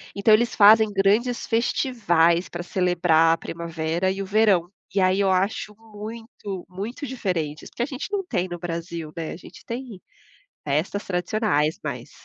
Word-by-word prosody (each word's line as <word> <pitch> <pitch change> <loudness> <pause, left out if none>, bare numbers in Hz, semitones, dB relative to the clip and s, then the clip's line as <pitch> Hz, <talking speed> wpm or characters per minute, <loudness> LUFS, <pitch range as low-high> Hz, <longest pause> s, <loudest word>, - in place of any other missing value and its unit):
Então 205 +2 +4
eles 235 +2 +3
fazem 215 +1 +7
grandes 210 +5 +1
festivais 195 -8 +2
para 175 0 -5
celebrar 175 -3 +3
a - - -1
primavera 165 +2 -2
e 195 +1 -4
o - - -6
verão. 195 -4 +3 0.3
E - - +3
aí, 185 +1 +3
eu 195 -1 +3
acho 195 +3 0
muito 215 -3 -8
muito 210 +10 -6
diferentes, 175 - -3
porque 240 - -3
a - - +1
gente 270 -1 -5
não 400 -1 -1
tem 185 - -1
no 175 -1 -6
Brasil, 170 -2 -5
né. 165 -1 -4
A - - -8
gente - - -14
tem 235 -5 -6 0.7
festas 155 +8 -1
tradicionais, 180 -4 0
mas - - -5
190 Hz, 160 wpm, -24 LUFS, 170-220 Hz, 0.7 s, fazem